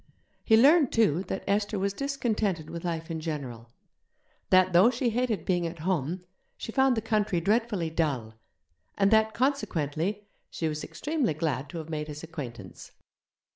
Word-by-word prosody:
He 220 - +5
learned, 285 +3 +6
too, 185 -8 +3
that 190 - -4
Esther 205 +1 0
was 195 +1 -1
discontented 220 - -2
with 170 -1 -6
life 165 -1 -3
in 160 - -3
general; 135 -8 -5 0.8
that, 185 -1 +5
though 185 +7 +7
she 245 -1 0
hated 225 -6 -1
being 175 -2 +1
at 165 +1 -7
home, 175 0 -1 0.3
she - - -6
found 265 0 +3
the 220 - -1
country 215 -5 +1
dreadfully 205 -3 0
dull; 140 -9 -1 0.6
and 195 0 +3
that, 220 0 +3
consequently, 205 - -1 0.2
she 160 - -3
was 155 -1 -3
extremely 295 - -2
glad 145 -3 -2
to 170 - -7
have 160 -1 -7
made 150 -1 -3
his 150 0 -8
acquaintance. 120 - -8
185 Hz, 160 wpm, -28 LUFS, 155-220 Hz, 0.8 s, though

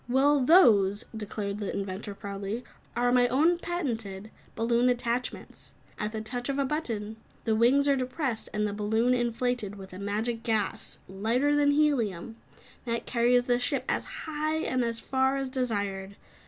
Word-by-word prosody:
"Well 275 +2 +4
those," 210 - +5
declared 210 -1 -4
the 205 - -3
inventor 200 +1 -4
proudly 200 +4 -5 0.3
"are 245 0 +2
my 245 0 +5
own, 315 +8 +3
patented, 225 - -4 0.2
balloon 235 +2 +2
attachments. 245 0 -3 0.3
At 210 -1 -2
the 220 0 -4
touch 245 +4 -4
of 275 - -1
a 280 - +1
button, 225 -8 -3 0.3
the 225 - +1
wings 260 +6 +4
are 280 - +4
depressed 255 -2 -2
and 210 0 0
the 205 - -3
balloon 220 +4 +1
inflated 240 -3 -1
with 190 -2 -11
a 185 - -8
magic 220 +4 -2
gas, 220 -4 -2
lighter 230 +10 +1
than 290 0 +4
helium, 240 - +1 0.5
that 235 -1 -2
carries 245 0 +3
the 245 0 +1
ship 245 - -1
as - - 0 0.2
high 310 0 -1
and 255 -4 0
as 230 -1 -2
far 265 0 +1
as 270 -1 -2
desired. 200 -7 -2
235 Hz, 160 wpm, -28 LUFS, 210-260 Hz, 0.5 s, those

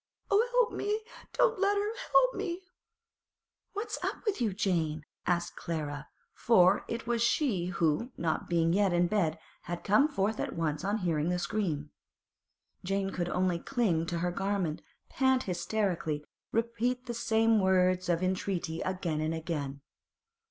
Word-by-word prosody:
'Oh, 405 +3 +5
help - - +4
me! 420 +2 -1 0.3
Don't 465 -4 +3
let 400 +1 +3
her! 415 +2 0 0.2
Help - - +5
me!' 350 0 -3 1.1
'What's 415 +3 -4
up - - -3
with 405 - 0
you, 225 -4 +2
Jane?' 165 -6 0 0.2
asked 175 -1 0
Clara, 150 -3 -4 0.3
for 190 -4 +4
it 230 0 -4
was 235 -1 0
she 235 - +2
who, 175 - 0
not 160 -2 -1
being 165 -1 +2
yet 195 -1 +3
in 175 0 +4
bed, 175 -4 +1 0.3
had 175 0 -4
come 210 +9 +4
forth 220 -6 -1
at - - -3
once 155 -2 -1
on 200 +3 0
hearing 165 -5 0
the 180 - +1
scream. 165 -7 -2 0.9
Jane 195 +1 -1
could 175 -2 -2
only 180 -1 +1
cling 180 -9 0
to 170 - -2
her 175 +1 0
garment, 195 -4 -1 0.3
pant 260 -1 +2
hysterically, 175 -5 -1 0.3
repeat 235 +2 0
the 240 - -4
same 225 -1 +3
words 185 -1 +3
of 170 +1 +1
entreaty 185 -3 -1
again 180 -4 -2
and 160 +1 -1
again. 145 -4 -4
185 Hz, 150 wpm, -30 LUFS, 170-230 Hz, 1.1 s, Oh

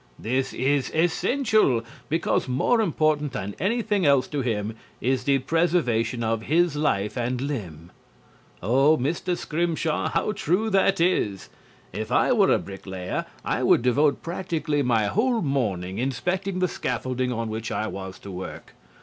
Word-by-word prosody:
This 130 +3 -1
is 135 +1 0
essential, 175 - +2 0.3
because 165 -1 0
more 140 - +2
important 155 - +1
than 100 -5 -4
anything 210 -1 0
else 140 -4 +4
to 145 -2 -2
him 110 -3 -2 0.2
is 125 +1 0
the 140 -1 +4
preservation 130 -6 +1
of 115 0 0
his 165 +5 +2
life 105 -9 0
and 125 0 -1
limb." 90 - -5 0.7
Oh, 135 +9 +4
Mr. 170 +6 -1
Scrimshaw, 165 -1 -1
how - - 0
true 210 +2 0
that 195 -1 +3
is! 110 - +1 0.4
If 110 +2 -4
I - - +3
were 210 -6 +4
a - - +5
bricklayer 95 -2 -5 0.2
I - - 0
would - - +4
devote 140 +3 +2
practically 165 -4 -2
my 115 -5 +2
whole 230 - +1
morning 100 - -1
inspecting 180 - -1
the 185 0 +2
scaffolding 130 -5 -2
on 115 -2 -2
which 110 0 -4
I 110 - -1
was 95 -3 -6
to 100 - -8
work. 95 0 -8
135 Hz, 150 wpm, -25 LUFS, 115-170 Hz, 0.7 s, a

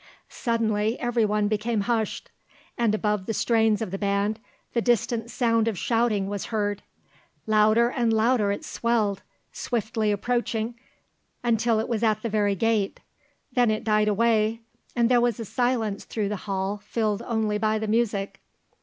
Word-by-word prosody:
Suddenly 225 -1 0
everyone 215 -4 +1
became 215 +1 0
hushed, 225 0 -2 0.4
and 230 -3 +1
above 210 -3 -1
the 225 - -1
strains 225 -2 +2
of 185 - -6
the 195 - -4
band 200 +2 0 0.3
the 235 - +1
distant 235 0 0
sound 230 -2 +1
of 220 -4 -1
shouting 225 -1 +1
was 200 -1 -4
heard. 205 -3 -2 0.6
Louder 215 +2 +4
and 235 -3 +1
louder 220 -1 +2
it 200 - -4
swelled, 215 -4 0 0.3
swiftly 220 -2 -1
approaching 235 +1 -1 0.7
until 230 -1 +2
it 220 - -2
was 230 -3 -1
at 215 -2 +1
the 230 - -1
very 205 -2 +1
gate; 215 -1 0 0.5
then 245 -3 +3
it 215 0 -1
died 215 -1 +2
away, 220 +1 +2 0.3
and 235 -1 +3
there 245 0 +4
was 240 -2 +1
a 225 - -4
silence 230 -3 -1
through 210 -3 -3
the 210 - -2
hall 195 +1 -1
filled 210 0 -2
only 220 -3 -1
by 215 0 +1
the 215 0 -3
music. 210 -3 0
220 Hz, 155 wpm, -25 LUFS, 210-235 Hz, 0.7 s, Louder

